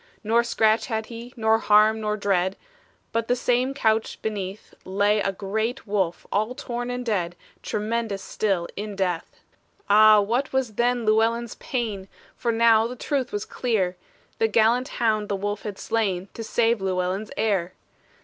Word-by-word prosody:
Nor 230 +2 +3
scratch 220 -1 +2
had 220 -2 -2
he, 235 +2 -8
nor 220 0 +3
harm, 215 +1 +4
nor 210 0 -1
dread, 190 -2 +1 0.6
But 230 0 -1
the 245 - +2
same 250 +2 +1
couch 220 -3 +1
beneath 200 -2 -5
Lay 205 +2 +2
a 195 - 0
great 220 +6 -3
wolf, 195 -5 -1
all 215 +5 0
torn 245 -2 -4
and 245 0 -4
dead, 180 -6 -1 0.3
Tremendous 215 -1 -2
still 190 -5 -1
in 205 0 -5
death! 180 -4 -3 0.5
Ah, 215 0 +8
what 235 +7 0
was 265 -4 0
then 240 +1 +1
Llewellyn's 225 +2 +2
pain! 215 -7 -4 0.3
For 235 - -1
now 225 -1 +4
the 250 - -7
truth 270 0 -2
was 205 0 -3
clear; 200 -7 -1 0.4
The 225 - +4
gallant 230 +4 +3
hound 215 -3 0
the 200 - 0
wolf 205 +1 -3
had 205 -2 -6
slain, 200 -5 -1
To 225 - -6
save 230 -1 +1
Llewellyn's 190 +2 -1
heir. 195 -5 0
220 Hz, 160 wpm, -24 LUFS, 200-235 Hz, 0.6 s, Ah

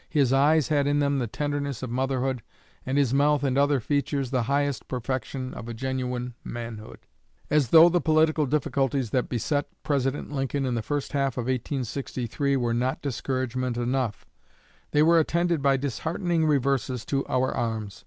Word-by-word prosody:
His 140 -5 +2
eyes 145 +2 +4
had 145 -2 +2
in 145 0 +2
them 140 -1 +1
the 120 - -1
tenderness 145 0 -3
of 125 - -4
motherhood, 130 0 -1 0.5
and 135 +2 0
his 135 -3 +2
mouth 145 +1 +3
and 135 -2 +1
other 140 0 +3
features 140 +1 -1
the 130 -2 +1
highest 140 -1 0
perfection 130 +1 -4
of 115 - -8
a 115 - -5
genuine 125 0 -3
manhood." 115 -2 -8 0.5
As 150 -4 +3
though 165 +4 +9
the 175 0 +2
political 155 -1 +3
difficulties 135 -3 0
that 125 - 0
beset 145 +4 -1 0.2
President 140 0 -1
Lincoln 135 0 -1
in 125 - -1
the 115 - -1
first 145 +4 -3
half 140 -2 +1
of 125 - -1
1863 130 +1 -2
were 120 -2 0
not 125 +3 -1
discouragement 130 -2 -2
enough, 120 -2 -1 0.6
they 150 - +3
were 165 +1 +5
attended 170 0 +1
by 135 -1 +3
disheartening 160 - -1
reverses 135 -4 0
to 135 -1 0
our 130 0 +1
arms. 110 -3 -3
135 Hz, 165 wpm, -26 LUFS, 125-145 Hz, 0.6 s, though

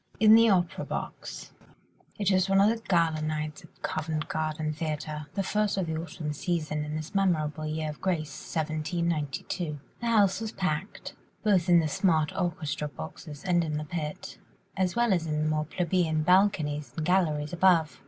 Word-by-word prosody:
IN 215 0 +8
THE 230 0 +7
OPERA 180 -3 +1
BOX - - -6 0.7
It 205 -1 +1
was 185 0 +3
one 195 0 +4
of 200 +2 +6
the 225 0 -2
gala 165 -4 +2
nights 155 +3 -3
at 165 - -20
Covent 155 -1 -2
Garden 155 -1 -2
Theatre, 155 -1 -4
the 195 - 0
first 210 +1 0
of 190 - +1
the 160 -1 -3
autumn 160 -2 -4
season 155 -1 -2
in 150 0 -4
this 155 +1 -5
memorable 155 -6 +1
year 155 0 -2
of 150 - -13
grace 155 -7 -3
1792. 155 0 -2 0.2
The 235 - -3
house 210 -3 +3
was 220 -1 -4
packed, 180 +1 -3 0.3
both 190 -5 +3
in 175 -1 +7
the 155 - 0
smart 155 -1 +1
orchestra 155 -3 -2
boxes 145 - -9
and 175 -2 +2
the 155 -2 -2
pit, 150 -1 -5 0.4
as 185 0 0
well 235 -3 +3
as 165 -3 0
in 150 0 0
the - - +1
more 155 0 0
plebeian 165 -1 0
balconies 150 -7 +2
and 155 - -1
galleries 155 -5 +1
above. 170 -3 +3
160 Hz, 175 wpm, -28 LUFS, 155-185 Hz, 0.7 s, IN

